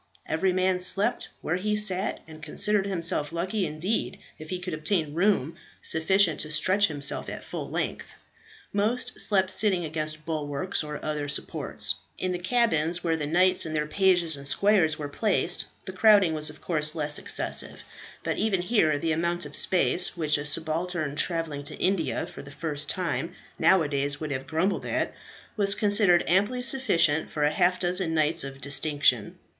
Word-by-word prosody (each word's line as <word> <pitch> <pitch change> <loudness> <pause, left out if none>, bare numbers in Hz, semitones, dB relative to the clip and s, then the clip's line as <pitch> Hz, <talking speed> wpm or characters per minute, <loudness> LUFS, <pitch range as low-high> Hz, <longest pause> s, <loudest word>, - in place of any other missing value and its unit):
Every 185 +4 0
man 185 0 +1
slept 200 +6 +1
where 175 - -1
he 210 +3 -1
sat, 200 -1 +2
and 155 -1 -12
considered 200 +6 0
himself 170 -5 -1
lucky 185 +3 -2
indeed 160 +9 -3 0.2
if 155 0 -10
he 185 - -3
could 180 -1 -6
obtain 155 -1 -1
room 170 -4 +1 0.3
sufficient 170 0 +3
to 155 - -4
stretch 185 +6 +2
himself 145 -2 -1
at - - -7
full - - -6
length. - - -4 0.6
Most 235 +5 -1
slept 190 -3 +2
sitting 190 -3 +2
against 155 0 -4
bulwarks 155 +3 -3
or 150 -1 -6
other 150 -1 -2
supports. 140 - -2 0.2
In 185 - -2
the 180 - -3
cabins, 175 -5 +1
where 165 -2 +1
the 150 -2 -3
knights, 180 +3 +3
their 155 -1 -1
pages 175 -1 +2
and 140 0 -9
squires, 160 0 +2
were 150 -2 -5
placed, 180 +2 +1 0.2
the 190 - -7
crowding 200 -3 +5
was 155 -1 -2
of 150 - -13
course 155 -2 +1
less 150 -2 -1
excessive, - - +1 0.4
but - - -2
even 195 -4 0
here 180 -8 +2
the 160 +2 -2
amount 170 +2 -1
of - - -7
space, 180 -1 +1
which 155 -3 +1
a 145 - -5
subaltern 160 0 -1
travelling 165 -3 -2
to - - -4
India 185 -4 -1
for - - -10
the 140 - -12
first 145 -1 -3
time 180 -1 -2 0.2
now 190 -3 +4
a - - -2
days 145 0 -2
would 140 -4 -5
grumble 165 +5 -1
at, - - -2 0.4
was 200 -2 +4
considered 205 -4 +4
amply 205 +8 +1
sufficient 170 - +3
for 150 -1 0
half 175 +4 +2
a - - -14
dozen 180 -2 +1
knights 155 +1 +3
of 135 0 -8
distinction. 140 -4 +1
170 Hz, 170 wpm, -26 LUFS, 150-190 Hz, 0.6 s, crowding